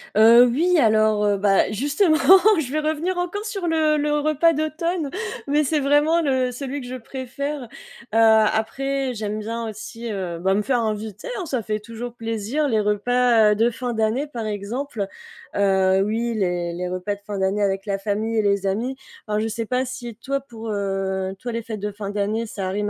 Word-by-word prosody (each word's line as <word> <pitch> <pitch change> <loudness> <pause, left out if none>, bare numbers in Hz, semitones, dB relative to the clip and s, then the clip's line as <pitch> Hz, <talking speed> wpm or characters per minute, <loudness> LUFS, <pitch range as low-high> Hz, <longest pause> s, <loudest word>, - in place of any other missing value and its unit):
Heu, 230 +3 +8
oui, 335 +9 +2
alors, 215 -3 +3
heu, 205 -1 +2
bah, 195 -1 +3
justement 295 - +2 0.4
je 265 -5 -3
vais 310 - 0
revenir 315 +4 -1
encore 355 +4 -3
sur 395 -5 -3
le 315 -2 +2
le 295 0 +1
repas 310 +2 +3
d'automne 310 +1 -2 0.4
mais 295 +2 +2
c'est 300 +1 +1
vraiment 295 +4 +3
le 260 -4 +1
celui 275 +2 -5
que 245 - -8
je 255 - -5
préfère. 265 +3 -5
Heu, 240 - -10 0.5
après, 225 +5 +2
j'aime 215 -1 -3
bien 230 +2 -4
aussi, 225 +2 -7
heu, 180 -4 -4
bah, 190 +2 +1
me 205 - +2
faire 245 +2 +1
inviter, 215 -2 -4
hein, 370 - -4
ça 260 -6 -2
fait 215 0 -2
toujours 230 +2 -7
plaisir 230 +6 -2
les 220 -4 +1
repas, 220 +2 +3
heu, 210 - +2
de 230 +3 +3
fin 245 0 -4
d'année 225 +6 0
par 235 -6 -5
exemple. 215 +2 -3 0.5
Heu, 190 -1 +3
oui, 230 +2 -1
les 175 -4 -1
les 180 +1 -4
repas 185 +3 -3
de 200 - -19
fin 205 -1 -4
d'année 190 +2 0
avec 195 0 -1
la 200 -2 -1
famille 215 +3 -2
et 220 - +4
les 200 -1 +1
amis. 235 +7 -1 0.3
Alors 210 0 0
je 220 - -1
sais 225 +1 -3
pas 255 +3 0
si 245 -3 -7
toi 275 +4 -2
pour, 230 -4 -9
heu, 195 -1 -2
toi 245 - -5
les 230 0 -3
fêtes 220 -2 -6
de 210 +1 -3
fin 200 0 -6
d'année, 210 +3 -1
ça 195 -4 -4
rime 205 +2 -1
225 Hz, 200 wpm, -22 LUFS, 205-275 Hz, 0.5 s, Heu